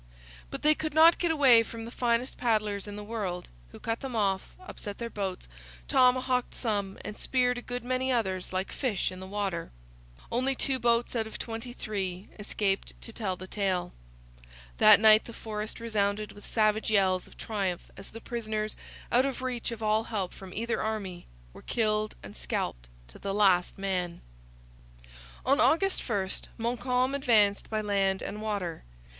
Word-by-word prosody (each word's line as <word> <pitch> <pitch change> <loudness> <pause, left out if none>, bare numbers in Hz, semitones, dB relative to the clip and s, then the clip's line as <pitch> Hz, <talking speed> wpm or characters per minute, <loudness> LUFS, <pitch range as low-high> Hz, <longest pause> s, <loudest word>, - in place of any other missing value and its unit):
But - - -6
they 305 - +6
could 310 0 -4
not 325 +2 +7
get 345 - +1
away 270 -7 +7
from 225 0 -6
the 230 - -8
finest 240 0 0
paddlers 215 -4 0
in 205 - -6
the 210 - -6
world, 205 -5 -4 0.2
who - - -11
cut 225 0 -2
them 265 -3 -5
off, 195 -3 0
upset 210 - -8
their 235 -1 -5
boats, 190 - -4 0.4
tomahawked 255 0 +3
some, 205 -5 -2
and 210 0 -6
speared 250 -1 +1
a - - -8
good 245 -1 -5
many 255 +1 0
others 190 -7 -1
like 190 +1 -2
fish 220 -9 -1
in 185 - -8
the 190 - -8
water. 195 -4 -2 0.6
Only 260 +3 +2
two 265 0 0
boats, 235 +1 +2
out 225 -2 0
of 220 - -7
twenty 225 +2 -5
three, 195 -5 -4
escaped 200 -1 -1
to 230 - -8
tell 200 -5 -2
the 185 - -9
tale. 185 -3 -1 0.9
That - - +9
night 215 0 +7
the 235 - -9
forest 215 0 -5
resounded 210 -2 0
with 205 - -12
savage 215 -1 +2
yells 190 -3 +3
of - - -17
triumph 195 -5 -3
as 195 - -9
the 225 - -9
prisoners, 215 -3 -3 0.4
out 255 +3 +4
of 260 -1 -4
reach 250 -2 -2
of 230 -2 -6
all 215 +1 +2
help 195 -5 -3
from 190 -1 -10
either 230 +4 -1
army, 200 -5 -3 0.3
were - - -12
killed 215 -2 0
and 100 0 -9
scalped - - -3 0.2
to - - -13
the 195 0 -3
last 190 -4 +3
man. 180 -3 -2 1.2
On 275 +3 +4
August 390 +5 +3
1 200 -4 +1 0.3
Montcalm 250 +3 0
advanced 220 -7 +3
by 215 -1 0
land 195 -2 +1
and 210 - -5
water. 200 -6 -3
215 Hz, 175 wpm, -29 LUFS, 195-240 Hz, 1.2 s, That